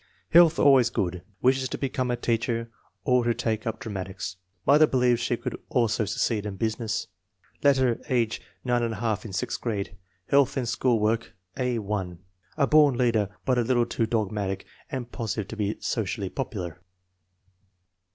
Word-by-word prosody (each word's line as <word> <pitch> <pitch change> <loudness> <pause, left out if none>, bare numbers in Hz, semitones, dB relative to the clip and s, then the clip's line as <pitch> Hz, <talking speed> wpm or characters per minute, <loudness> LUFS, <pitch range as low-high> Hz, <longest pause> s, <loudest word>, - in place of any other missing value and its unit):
Health 170 -1 +7
always 130 -4 +6
good. 90 -5 -2 0.2
Wishes 130 0 +3
to - - -3
become 130 -2 -1
a 120 - +1
teacher 115 0 -1 0.3
or 125 -1 +3
to 120 0 +1
take 110 -1 -2
up 110 0 -3
dramatics. 95 -3 -5 0.3
Mother 150 +3 +6
believes 125 -3 +2
she 120 0 0
could - - -4
also 115 -3 +1
succeed 105 +1 0
in 105 -2 -5
business. 110 +1 -2 0.6
Later, 130 -4 +3
age 120 -3 +1 0.2
9$, 115 -3 0
in 110 - -6
sixth 95 - -3
grade. 100 -5 -3 0.3
Health 140 0 +3
and 125 -3 -1
school 120 0 +2
work 110 +2 0 0.2
A 125 -2 0
l. 100 -4 -3 0.4
"A 140 - +4
born 145 -3 +5
leader, 115 -5 +2 0.2
but 130 -2 +2
a - - +4
little 120 0 +2
too 115 -1 -1
dogmatic 105 -3 -1 0.2
and 125 -2 -5
positive 110 -3 -3
to - - -6
be 105 -1 -1
socially - - -2
popular." 90 -1 -5
115 Hz, 155 wpm, -26 LUFS, 105-125 Hz, 0.6 s, Health